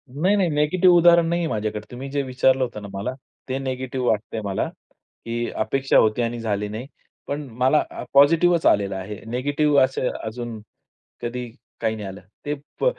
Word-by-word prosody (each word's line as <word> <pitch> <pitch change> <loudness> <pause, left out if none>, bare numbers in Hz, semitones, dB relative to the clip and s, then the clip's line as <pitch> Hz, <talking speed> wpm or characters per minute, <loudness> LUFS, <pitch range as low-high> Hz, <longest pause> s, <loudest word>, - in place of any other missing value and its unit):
नाही, 185 +7 +3
नाही. 185 -4 +2
निगेटिव्ह 175 +5 +4
उदाहरण 170 0 +6
नाहीये 170 -1 0
माझ्याकडे. 105 -4 -2
तुम्ही 130 +3 -7
जे 140 0 -1
विचारलं 130 0 +2
होतं 115 -4 -5
ना 100 - -7
मला, 100 +6 -3 0.4
ते 130 - -1
निगेटिव्ह 130 -1 -3
वाटतंय 110 +1 -1
मला, 100 -1 -1 0.6
की 120 0 -2
अपेक्षा 135 +2 +1
होती 110 +2 +3
आणि 120 0 -2
झाली 105 -2 -1
नाही. 115 +5 -6 0.4
पण 145 +1 -2 0.2
मला 130 +4 +4 0.3
पॉझिटिव्हच 165 +4 +5
आलेलं 100 -1 +3
आहे. 95 +2 -6
निगेटिव्ह 145 +3 +2
असे 130 -1 0 0.2
अजून 115 0 -5 0.6
कधी 125 +1 -4 0.3
काही 110 -1 0
नाही 105 -2 -6
आलं. 95 0 -8 0.2
ते 145 0 -1 0.3
फ - - +2
130 Hz, 165 wpm, -23 LUFS, 110-145 Hz, 0.6 s, उदाहरण